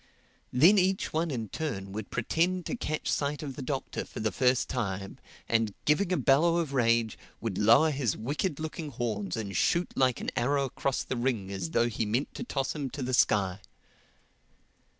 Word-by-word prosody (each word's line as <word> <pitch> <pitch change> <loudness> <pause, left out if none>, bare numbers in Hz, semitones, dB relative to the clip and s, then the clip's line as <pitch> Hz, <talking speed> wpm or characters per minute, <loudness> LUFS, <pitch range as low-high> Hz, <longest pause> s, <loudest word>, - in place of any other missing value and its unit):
Then 170 +11 +6
each 190 +1 0
one 165 +2 0
in 115 -7 -3
turn 100 -11 -4
would 105 +1 -6
pretend 175 +9 0
to - - -2
catch 155 -9 -3
sight 145 +1 -1
of 140 -3 -5
the 140 - -6
Doctor 135 0 -3
for - - -9
the 110 0 0
first 125 -1 +2
time 100 -5 -3 0.3
and 115 -3 +1
giving 170 +5 +2
a 180 - +2
bellow 155 +5 +4
of 160 -5 -1
rage, 115 -3 +2 0.2
would 110 -5 -3
lower 120 +9 +6
his 135 -8 -1
wicked 145 - -2
looking 155 0 -5
horns 115 -7 -3
and 100 -4 -4
shoot 170 - +2
like 130 -2 +2
an - - -3
arrow 140 +3 +1
across 135 0 -2
the 130 - -4
ring 120 -6 -1
as 95 -4 -3
though 115 +7 +2
he 115 -1 -2
meant 120 +7 -1
to - - -5
toss 135 - -2
him 145 -4 -3
to 140 0 -5
the 130 +1 -2
sky. 100 -4 +2
130 Hz, 190 wpm, -29 LUFS, 110-150 Hz, 0.3 s, Then